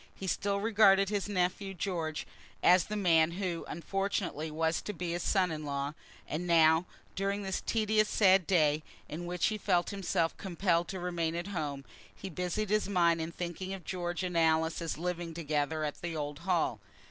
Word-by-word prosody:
He 195 - -7
still 200 +2 0
regarded 200 -2 +5
his 205 -1 -2
nephew 195 +1 -1
George 165 -4 -3 0.4
as 180 0 +6
the 210 - -4
man 170 -5 +3
who, 180 -2 -3
unfortunately, 185 -2 -2
was 160 +1 0
to 210 - -5
be 175 -1 -4
his 175 +1 -2
son 185 -2 +2
in 155 -1 -4
law, 140 0 -3 0.3
and 175 +3 -3
now, 165 0 +5 0.3
during 200 +1 -1
this 190 -1 -2
tedious 215 -1 +1
sad 190 -4 +4
day, 155 -4 +3 0.3
in 175 +3 -6
which 180 0 0
he 215 -1 -3
felt 180 -2 +1
himself 180 -4 0
compelled 175 -2 0
to 190 - -5
remain 170 -2 -1
at 175 +3 -4
home, 145 -7 -3 0.3
he 195 - -7
busied 180 +5 -2
his 215 -1 +1
mind 170 -4 +3
in 160 +1 -4
thinking 180 +3 -5
of 185 -4 -12
George 175 0 -3
and 180 -1 -3
Alice, 160 0 +2
as 165 -3 -3
living 170 -1 -3
together 155 -1 -1
at 150 -1 -4
the 170 -1 -4
old 145 -1 -4
Hall. 170 - 0
175 Hz, 180 wpm, -31 LUFS, 160-195 Hz, 0.4 s, as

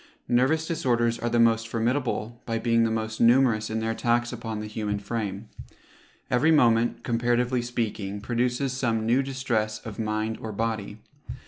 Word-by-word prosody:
Nervous 135 +7 +2
disorders 120 -8 0
are 120 - -1
the 120 - +1
most 115 -1 +3
formidable, 120 0 -2
by 115 -1 -1
being 115 0 +2
the - - +1
most 110 0 -3
numerous 120 -2 +4
in 110 0 -2
their 110 0 -1
attacks 120 +1 0
upon 115 -2 -5
the 105 - -5
human 105 -1 -3
frame. 100 0 -4 0.8
Every 130 +6 +3
moment, 120 -6 +3
comparatively 120 +1 +1
speaking, 110 -4 -3
produces 125 +4 -1
some 115 -4 0
new 120 +4 +3
distress 120 -5 -1
of 110 -2 -7
mind 110 0 -2
or 110 - -5
body. 110 -1 -3
115 Hz, 155 wpm, -26 LUFS, 110-120 Hz, 0.8 s, numerous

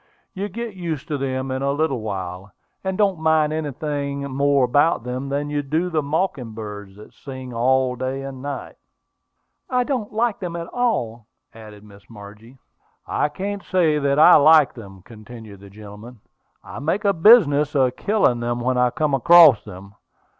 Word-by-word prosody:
You 200 +2 -5
get 235 -1 -6
used 165 -5 -5
to 150 - -2
them 130 0 -3
in 130 0 -3
a 140 0 0
little 140 -4 -1
while, 95 -2 -6 0.3
and 190 -1 -3
don't 195 -5 +1
mind 160 -1 +2
anything 145 -2 -4
more 140 0 +2
about 145 +3 +1
them 130 +3 -5
than 145 +1 -3
you 145 0 -1
do 160 +6 -2
the 155 -2 0
mocking 145 - -3
birds 105 -3 -9
that 105 - -15
sing 130 -2 -9
day 130 +2 -1
and 135 -1 -8
night." 140 0 -7 0.9
"I 250 -1 +1
don't 245 -5 -3
like 225 0 -1
them 175 -3 -5
at 170 0 -5
all," 120 - -2 0.3
added 105 -2 -13
Miss 100 -1 -18
Margie. 105 +3 -14 0.5
"I 150 - -1
can't 200 +6 -5
say 165 -5 +1
that 140 0 0
I 155 - +8
like 155 -1 +5
them," 95 -6 -13
continued 110 -1 -13
the 100 0 -14
gentleman. 105 +3 -13 0.4
"I - - -9
make 165 +9 -2
a 200 - +3
business 160 - +4
of 130 -2 +2
killing 200 - +1
them 120 0 -3
when 125 +1 -1
I 125 0 +3
come 150 +3 -2
across 155 -2 +6
them. 100 0 -12
140 Hz, 170 wpm, -21 LUFS, 115-160 Hz, 0.9 s, I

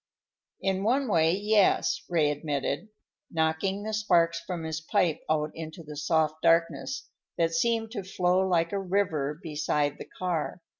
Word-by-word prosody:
"In 190 0 +1
one 255 +6 +2
way, 165 -5 +3
yes," 205 +2 +2
Ray 155 -4 +3
admitted, 145 +2 -2 0.4
knocking 165 +5 0
the 220 0 -4
sparks 170 -6 +2
from 170 0 -5
his 160 0 -3
pipe 165 -2 +1
out 155 -1 +1
into 160 +1 -8
the 150 -1 -9
soft 155 +1 +1
darkness 165 +10 +1 0.3
that 165 -1 +1
seemed 225 +5 +1
to 205 -5 -4
flow 180 -1 +1
like 175 -3 +2
a 200 - -1
river 165 -6 0
beside 150 -2 -1
the - - -9
car. 175 -1 -2
170 Hz, 150 wpm, -28 LUFS, 160-195 Hz, 0.4 s, way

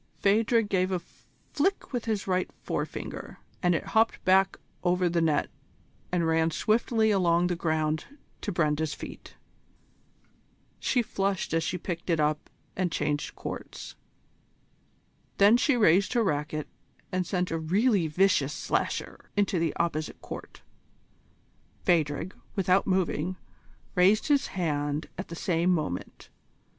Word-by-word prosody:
Phadrig 220 +2 +3
gave 185 -2 +1
a 185 - 0 0.5
flick 380 0 0
with 245 -2 -2
his 215 -3 -1
right 185 -1 0
forefinger, - - -4 0.2
and 175 -1 +3
it - - -3
hopped 225 +1 +2
back 190 +1 +4 0.3
over 180 0 +2
the 170 0 +1
net 160 -2 +2 0.6
and 175 -2 +1
ran 160 0 +3
swiftly 220 +4 +2
along 175 -3 +3
the 180 0 0
ground 155 -1 0 0.4
to 205 - -2
Brenda's 155 -3 0
feet. - - -10 1.4
She 245 -3 +1
flushed 195 -5 -1
as 165 0 +2
she 180 - -2
picked 175 0 -5
it 165 -2 +2
up 150 0 0 0.3
and 180 -2 0
changed 145 -1 -1
courts. - - -7 1.4
Then 205 +3 +7
she 255 +2 +3
raised 200 -1 +4
her 240 -2 +3
racquet 150 -3 -1 0.4
and 185 -1 -1
sent 180 -2 -1
a 165 - -1
really 190 +3 +2
vicious 150 -4 +2
slasher - - -2
into 200 -3 +2
the 165 -2 0
opposite 155 -2 -2
court. - - -9 1.2
Phadrig, 165 +1 +1 0.2
without 190 -1 +2
moving, 185 -2 0 0.6
raised 195 +9 +4
his 285 -1 +3
hand 145 -3 -1
at 190 - -4
the 170 - -7
same 170 0 +1
moment. 155 - -2
180 Hz, 130 wpm, -28 LUFS, 160-200 Hz, 1.4 s, Then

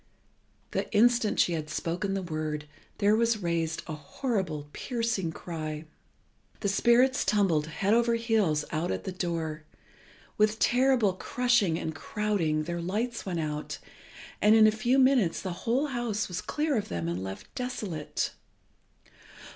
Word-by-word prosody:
The - - -2
instant 235 0 +4
she 175 - +4
had 155 -2 -3
spoken 175 +5 -2
the 195 - -2
word 155 -3 -3 0.3
there 205 0 +4
was 230 0 +2
raised 165 -2 -1
a 160 - -5
horrible, 155 - -3
piercing 230 -8 -2
cry. 155 -2 -5 0.8
The 200 - +1
spirits 245 +6 +4
tumbled 180 -8 +2
head 195 +6 0
over 235 0 +3
heels 215 -10 +1
out 170 +2 -1
at - - -2
the 190 - -4
door, 165 -4 -3 0.8
with 215 +1 +3
terrible 245 -5 +3
crushing 225 -4 +1
and 160 - -3
crowding, 170 -4 -1
their 170 +2 -3
lights 215 +6 -2
went 175 -3 -1
out, 150 -1 -4 0.6
and 210 +1 +6
in 220 -1 +7
a 215 - +6
few 240 +4 +1
minutes 255 -10 +4
the 185 -2 -4 0.2
whole 260 +5 +3
house 235 -5 -1
was 180 0 -4
clear 300 -1 -1
of 210 - -2
them 85 -1 -3
and 85 +2 -2
left 95 0 -8
desolate. 210 - -3
195 Hz, 145 wpm, -28 LUFS, 160-230 Hz, 0.8 s, in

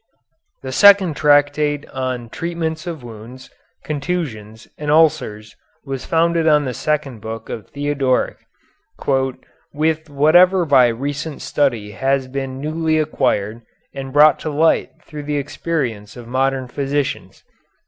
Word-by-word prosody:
The 130 - -5
second 195 +1 +6
tractate 145 0 +2
on 130 -2 -3
the 115 - -14
treatments 165 -1 -4
of 160 -6 -6
wounds, 120 +3 -11 0.3
contusions, 140 -9 -4
and 150 0 -5
ulcers 120 -9 +2 0.3
was 135 -2 -5
founded 165 0 +2
on 150 -2 +4
the 130 - -3
second 145 -4 -2
book 110 0 -7
of 105 -4 -6
Theodoric 140 -2 0 1.4
"with 155 +1 0
whatever 175 +6 +4
by 135 -5 +5
recent 140 +6 -4
study 120 -8 0
has 135 +3 0
been 135 0 -5
newly 155 +2 0
acquired 115 -8 0 0.3
and 135 -1 -6
brought 150 +2 +5
to 155 - -4
light 155 +2 +2
through 150 -2 -8
the 145 0 -2
experience 130 -8 -3
of 120 -1 -10
modern 130 +1 0
physicians." 140 +2 -3
145 Hz, 130 wpm, -19 LUFS, 130-155 Hz, 1.4 s, second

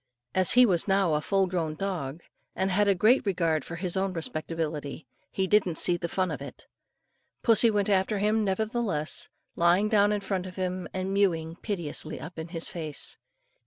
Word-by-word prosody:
As 185 -1 +5
he 250 0 +7
was 180 -5 +1
now 195 -4 +2
a 150 - +1
full 195 +3 +1
grown 170 -4 -2
dog, 165 -5 -4 0.3
and 190 +1 0
had 205 +2 +2
a 200 - +4
great 220 +8 +4
regard 170 -6 0
for 170 - -7
his 175 0 -1
own 190 0 0
respectability, 160 -2 -4 0.2
he 190 - -1
didn't 190 -3 +2
see 175 - +3
the 170 0 -3
fun 185 +1 -1
of - - -5
it. - - -10 0.8
Pussy 230 0 +5
went 205 -2 +1
after 200 +1 +1
him 215 +2 +1
nevertheless, 205 -5 -2 0.3
lying 175 +5 +3
down 205 -1 +4
in 205 -1 -1
front 190 -2 -3
of 185 - -10
him, 185 -1 -3
and 190 +1 -3
mewing 165 -5 +1
piteously 170 -7 -4
up 165 +1 -8
in 160 - -5
his 165 -1 -3
face. 155 -4 -3
185 Hz, 185 wpm, -27 LUFS, 165-200 Hz, 0.8 s, he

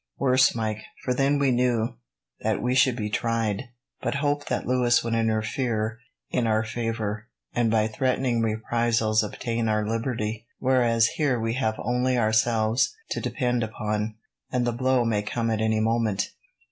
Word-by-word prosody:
"Worse, 130 -2 +4
Mike; 110 -2 -2 0.2
for 125 - 0
then 140 +3 +2
we 140 -2 +2
knew 120 -2 +1 0.4
that - - 0
we 125 +1 0
should 130 -1 +4
be 105 -3 -2
tried, 115 +1 -1 0.4
but - - -1
hoped 145 0 -1
that - - -1
Louis 125 -1 +3
would 115 0 -2
interfere 110 0 0 0.3
in 120 -2 +1
our 110 0 +2
favour, 110 -1 -3 0.3
and 120 -2 +2
by 110 -1 +3
threatening 125 +1 0
reprisals 110 0 +1
obtain 115 +2 -2
our 105 0 +1
liberty; 115 -1 -2
whereas 120 -3 +3
here 135 0 0
we 115 0 -1
have 110 -4 0
only 125 +2 0
ourselves 110 - +2 0.2
to - - -1
depend 125 -1 0
upon, 110 -1 -2 0.4
and 125 -1 +1
the 120 - 0
blow 130 0 +2
may 110 -3 +1
come 115 +2 -2
at 110 -1 0
any 110 0 +2
moment." 110 -3 0
115 Hz, 160 wpm, -25 LUFS, 110-125 Hz, 0.4 s, Worse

